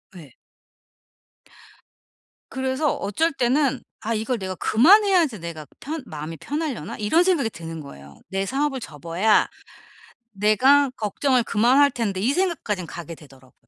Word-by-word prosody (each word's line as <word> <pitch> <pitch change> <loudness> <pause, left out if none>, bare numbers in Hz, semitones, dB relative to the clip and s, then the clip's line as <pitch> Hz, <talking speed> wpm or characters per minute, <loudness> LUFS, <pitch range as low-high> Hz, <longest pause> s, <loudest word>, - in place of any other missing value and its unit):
예. 150 -8 -13 2.1
그래서 265 +3 -1
어쩔 265 +12 0
때는 270 +1 +1 0.2
'아 230 - -2
이걸 225 +3 -1
내가 190 -2 -5
그만해야지 345 - +4
내가 165 -2 -7
편 310 0 -5
마음이 155 -1 -7
편하려나?' 275 - -4
이런 265 +12 +2
생각이 335 -11 +1
드는 165 -4 -8
거예요. 70 - -13
'내 195 0 -2
사업을 270 +3 -1
접어야 170 - +1 0.8
내가 250 +8 +4
걱정을 245 +3 0
그만할 255 +7 +3
텐데.' 210 -6 -2
이 235 +8 +1
생각까진 290 - -1
가게 170 -1 -8
되더라고. 135 -4 -18
225 Hz, 290 characters per minute, -23 LUFS, 175-280 Hz, 2.1 s, 그만해야지